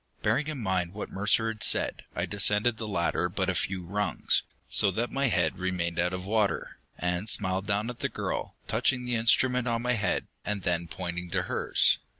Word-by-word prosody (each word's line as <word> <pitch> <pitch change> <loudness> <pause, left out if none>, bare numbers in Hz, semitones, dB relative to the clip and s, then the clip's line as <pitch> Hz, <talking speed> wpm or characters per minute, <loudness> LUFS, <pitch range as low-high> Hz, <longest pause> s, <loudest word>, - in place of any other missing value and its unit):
Bearing 150 +2 +1
in 155 -2 -3
mind 95 -6 -1
what 105 - -5
Mercer 105 +3 +2
had 110 -1 -6
said, - - +2
I - - 0
descended 105 +3 +2
the 110 - -4
ladder 90 -2 0
but 95 +1 0
a - - -3
few 95 0 -2
rungs, 105 +4 +1 0.3
so 100 - +4
that 115 +6 -2
my 140 0 +1
head 85 -8 +1
remained 90 -2 -1
out 90 +1 +2
of 90 0 -5
water, 105 0 0 0.2
and 90 +4 -1
smiled 95 -1 +1
down 105 +2 0
at 125 -1 -6
the - - -1
girl, - - -4
touching 125 -1 +1
the 125 - -1
instrument 125 +2 +3
on 115 0 0
my 125 0 +2
head, 105 -6 0 0.2
and 105 -2 -3
then 85 -1 0
pointing 90 +1 -5
to - - 0
hers. - - +2
100 Hz, 195 wpm, -28 LUFS, 90-115 Hz, 0.3 s, so